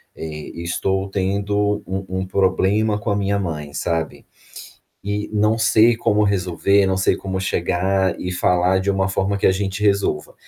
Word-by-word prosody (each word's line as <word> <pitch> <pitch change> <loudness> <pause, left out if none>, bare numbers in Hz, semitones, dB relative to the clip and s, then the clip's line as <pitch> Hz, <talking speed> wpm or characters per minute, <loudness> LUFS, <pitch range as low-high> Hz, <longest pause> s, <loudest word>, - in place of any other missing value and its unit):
eh, 75 -1 -7
estou 95 +3 -2
tendo 100 +2 -1
um 95 +1 -4 0.2
um - - -3
problema 100 +3 +1
com 105 - -4
a 100 - +1
minha 100 0 0
mãe, 75 -6 -5
sabe. 80 +1 -3 0.8
E 105 +1 -3
não 105 +2 +2
sei 115 +1 +4
como 105 -2 +1
resolver, 100 0 +2
não 95 0 0
sei 95 - +2
como 95 -1 -4
chegar 95 +1 0
e 90 - -3
falar 90 +1 +2
de 100 - -4
uma 95 0 0
forma 95 +1 -1
que - - +1
a - - +4
gente 95 +1 -3
resolva. 100 -7 0
95 Hz, 165 wpm, -20 LUFS, 90-100 Hz, 0.8 s, sei